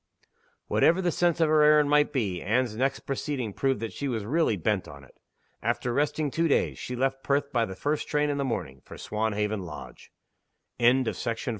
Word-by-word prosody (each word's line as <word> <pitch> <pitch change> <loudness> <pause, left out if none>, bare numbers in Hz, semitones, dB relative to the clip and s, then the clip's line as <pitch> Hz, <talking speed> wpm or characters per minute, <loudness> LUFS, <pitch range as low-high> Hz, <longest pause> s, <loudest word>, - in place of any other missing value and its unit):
Whatever 170 +3 +3
the 180 -2 +1
sense 175 0 +1
of 165 - +4
her 155 0 +4
errand 150 -1 +5
might 150 0 +3
be, 100 -10 -1
Anne's 115 +1 0
next 135 +4 0
proceeding 135 -5 -3
proved 135 -1 0
that 115 - -4
she 140 - -4
was 115 -5 -2
really 145 -3 +1
bent 100 +2 -1
on 70 -1 -11
it. 70 - -20 0.4
After 120 - -1
resting 145 +1 0
two 165 +3 +1
days, 145 - +1
she 125 - -5
left 135 +1 -1
Perth 140 0 0
by 115 -3 +2
the 95 - -7
first 145 +9 -2
train 150 0 +1
in 140 - -2
the - - +1
morning, 90 - -4
for - - -11
Swanhaven 105 -1 -2
Lodge. 75 -5 -10 0.7
NINTH 125 +1 +3
SCENE. 115 - -2
130 Hz, 195 wpm, -27 LUFS, 110-145 Hz, 0.7 s, errand